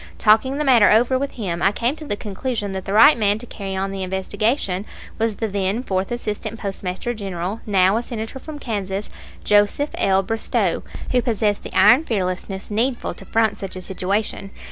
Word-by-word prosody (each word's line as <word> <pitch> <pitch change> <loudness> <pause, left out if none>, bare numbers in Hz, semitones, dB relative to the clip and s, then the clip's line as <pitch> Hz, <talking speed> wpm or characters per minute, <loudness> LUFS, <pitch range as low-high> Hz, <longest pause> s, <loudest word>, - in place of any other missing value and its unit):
Talking 225 +6 +3
the 300 - 0
matter 245 -7 +6
over 245 +4 +4
with 280 +1 -3
him, 175 -7 -3
I 195 +4 +4
came 240 +6 0
to 310 - -9
the 205 - -2
conclusion 205 +1 -4
that 190 -1 -5
the 195 - -3
right 285 +8 +8
man 205 -2 +2
to 235 - -6
carry 195 -4 -6
on 195 +1 -2
the 195 0 -5
investigation 190 +2 -1 0.4
was 225 -1 0
the 225 - -2
then 200 +3 -1
Fourth 190 -3 -2
Assistant 220 -1 -4
Postmaster 195 +3 -3
General, 195 -1 -4
now 195 0 +4
a - - 0
Senator 235 +1 -6
from 305 +2 -8
Kansas, 205 -6 -4 0.3
Joseph 205 +8 +3
L. 195 0 +2
Bristow, 225 +3 -1 0.3
who 250 - +3
possessed 215 -4 0
the - - -5
iron 225 +10 +7
fearlessness 190 - -3
needful 240 +4 -1
to - - -13
front 220 -2 +1
such 195 -1 -6
a 185 - -6
situation. 195 +2 -2
210 Hz, 190 wpm, -21 LUFS, 195-235 Hz, 0.4 s, right